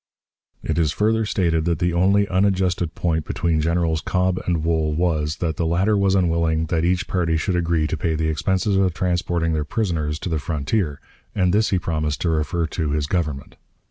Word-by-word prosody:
It - - -1
is 80 -3 +2
further 110 +4 +1
stated 85 -6 +1
that 85 -2 +1
the 85 +1 0
only 100 +3 +3
unadjusted 95 -3 0
point 80 -2 0
between 80 -1 0
Generals 80 0 0
Cobb 90 +1 0
and 85 -3 0
Wool 80 -2 0
was, 80 -3 0
that 80 -3 -2
the 85 - 0
latter 95 +6 +2
was 100 -1 +2
unwilling 85 -3 +1
that 80 -1 0
each 90 +1 +1
party 85 -4 0
should 90 +3 -1
agree 85 -2 +1
to 75 - -1
pay 80 +1 -1
the 80 0 -1
expenses 95 +6 0
of 95 -3 +1
transporting 85 -3 0
their 75 -1 0
prisoners 75 -4 -2
to 90 - -5
the 80 -2 -1
frontier, 75 +2 -2 0.4
and 90 -3 +2
this 110 +1 +3
he 95 - +2
promised 75 -4 -2
to 85 - +1
refer 80 +2 0
to 80 -1 -3
his 75 0 0
Government. 75 -4 -3
85 Hz, 195 wpm, -22 LUFS, 80-90 Hz, 0.4 s, only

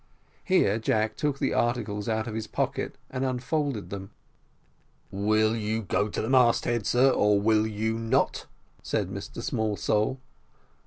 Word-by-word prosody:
Here 150 - +3
Jack 110 -1 0
took 145 -2 -1
the - - 0
articles 115 -3 -1
out 110 0 0
of 115 - -5
his 110 0 -4
pocket, - - -2
and 130 0 -2
unfolded 130 -1 -2
them. 95 -1 -6 1.0
"Will 110 +2 +2
you 110 0 -2
go 105 +1 0
to - - -3
the - - -2
mast 125 -2 +4
head, 120 -3 -1
sir, 130 +2 +4
or 105 -4 +3
will 110 +1 +3
you 110 +1 -2
not?" 115 +4 0 0.3
said - - -1
Mr - - -7
Smallsole. 105 +2 0
110 Hz, 150 wpm, -27 LUFS, 105-125 Hz, 1.0 s, mast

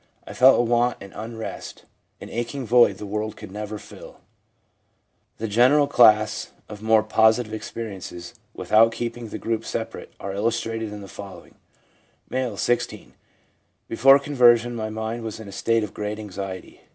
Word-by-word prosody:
'I - - -9
felt 130 +1 +6
a - - +4
want, 120 0 +1
an 100 - -12
unrest, 110 +1 -7 0.3
an - - -9
aching 120 +3 -4
void 120 -4 +4
the 105 - -7
world 105 +1 -3
could - - -10
never 105 +1 -5
fill/ 105 - -13 1.2
The 115 - -3
general 125 +7 +4
class 110 -6 +4
of 105 -1 -10
more 110 0 +4
positive 110 +1 +2
experiences, 100 -6 -7 0.2
with - - -8
out 115 +1 +6
keeping 120 0 -5
the - - -5
groups 115 -1 -3
separate, - - -5
are 100 0 -5
illustrated 115 +1 -2
in 105 0 -8
the 100 - -10
following: 100 0 -11 0.4
— - - -38
M., 125 -5 -2
16. 120 +7 -2 0.4
' - - -45
Before 135 +4 +6
conversion 120 -4 +3
my 110 -1 -3
mind 110 +2 -4
was 110 -1 -6
in 110 - -9
a - - -9
state 115 +3 0
of 105 - -6
great 105 0 -4
anxiety. 95 -3 -7
110 Hz, 165 wpm, -23 LUFS, 105-120 Hz, 1.2 s, felt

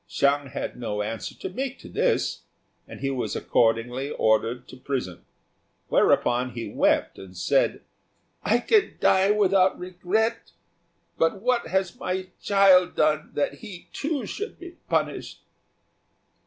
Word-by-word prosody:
Hsiang 140 0 +1
had 130 - -5
no 105 -3 -2
answer 110 +1 -5
to - - -6
make 265 +7 -4
to - - -13
this, - - 0 0.5
and - - -11
he 135 0 -1
was 130 -2 -3
accordingly 120 +4 +1
ordered 115 0 +1
to - - -10
prison; 125 -9 -4 0.7
whereupon 125 +1 +2
he 115 0 -5
wept - - +1
and 95 -1 -12
said, 90 - +1 0.6
"I 230 - +3
can 425 - +2
die 190 +1 +4
without 195 -2 +3
regret; 185 +5 -2 0.7
but 165 +4 +2
what 245 -4 +1
has 190 +1 -1
my 185 0 -3
child 195 -3 +5
done 155 0 +1
that 145 - -1
he, 200 -6 -10
too, 290 -5 -2
should 420 - -6
be 355 -1 -10 0.2
punished?" - - -2
175 Hz, 135 wpm, -25 LUFS, 125-200 Hz, 0.7 s, child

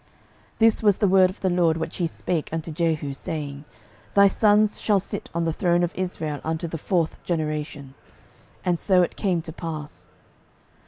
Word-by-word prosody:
12:015:012 - - -35
This 225 -1 +4
was 205 -3 +4
the 205 - +2
word 185 -1 +5
of 185 - -11
the 190 - +1
LORD 170 -2 +2
which 160 0 -4
he 175 - +1
spake 165 -1 -3
unto 165 0 -4
Jehu, 155 -3 -1
saying, 140 0 -5 0.5
Thy 200 0 +7
sons 210 +1 +3
shall 210 -2 +3
sit 200 +2 -6
on 170 - +1
the 165 - 0
throne 175 +1 +2
of 175 - -1
Israel 160 -5 -3
unto 160 +1 -2
the 165 0 -5
fourth 170 -1 -1
generation. 150 -4 -3 0.7
And 175 -2 +1
so 185 -3 +4
it - - -3
came 180 -5 0
to 160 - -7
pass. 155 -3 -7
170 Hz, 180 wpm, -24 LUFS, 155-185 Hz, 0.7 s, Thy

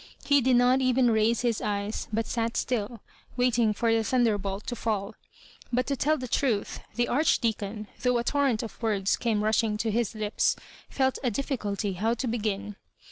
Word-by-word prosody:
He 285 -1 +4
did 255 0 +3
not 250 +2 +4
even 255 -1 +3
raise 220 +1 +2
his 235 -3 0
eyes, 205 +1 -2
but 225 +1 0
sat 230 -1 -2
still, 230 -2 -2 0.4
waiting 240 -3 +3
for 225 +2 +1
the 225 0 +2
thunderbolt 205 -4 0
to 240 - -3
fall 210 -4 -2 0.6
But 250 +1 +1
to 280 - -1
tell 305 +4 +1
the 255 -2 -5
truth, 230 -5 0 0.2
the 240 +1 +1
Archdeacon, 225 -6 0 0.2
though 250 -1 +2
a 235 - 0
torrent 270 -4 +1
of 225 0 -9
words 205 -4 +1
came 220 -3 0
rushing 215 0 +1
to 220 +1 -1
his 230 0 -1
lips, 215 -1 +1 0.3
felt 265 -1 0
a 250 - +1
difficulty 205 -7 -2
bow 225 +2 +2
to 245 - -3
b^;in. 210 -3 -2
230 Hz, 180 wpm, -27 LUFS, 210-250 Hz, 0.6 s, He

